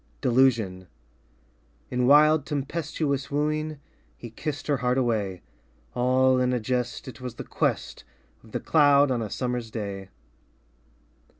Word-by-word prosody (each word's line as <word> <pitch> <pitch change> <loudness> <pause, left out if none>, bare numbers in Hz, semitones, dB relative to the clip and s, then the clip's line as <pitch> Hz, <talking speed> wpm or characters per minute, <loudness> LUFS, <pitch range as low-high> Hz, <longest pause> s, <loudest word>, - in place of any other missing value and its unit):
Delusion 115 -8 +2 1.0
In 125 0 +1
wild 150 +1 +5
tempestuous 145 -1 -2
wooing 155 +1 -1 0.4
He 115 - -9
kissed 145 +4 -5
her 145 -2 +1
heart 125 +1 0
away 105 -7 -1 0.5
All 130 +1 +3
in 125 0 +1
a 125 - +1
jest 125 +2 -3
It 130 -1 -10
was 125 -2 -6
the - - -6
quest - - -2 0.4
Of 110 - -17
the - - -2
cloud 145 -3 +4
on 120 -2 0
a 110 - -4
summer's 125 0 -3
day. 100 -3 -6
125 Hz, 130 wpm, -26 LUFS, 115-145 Hz, 1.0 s, wild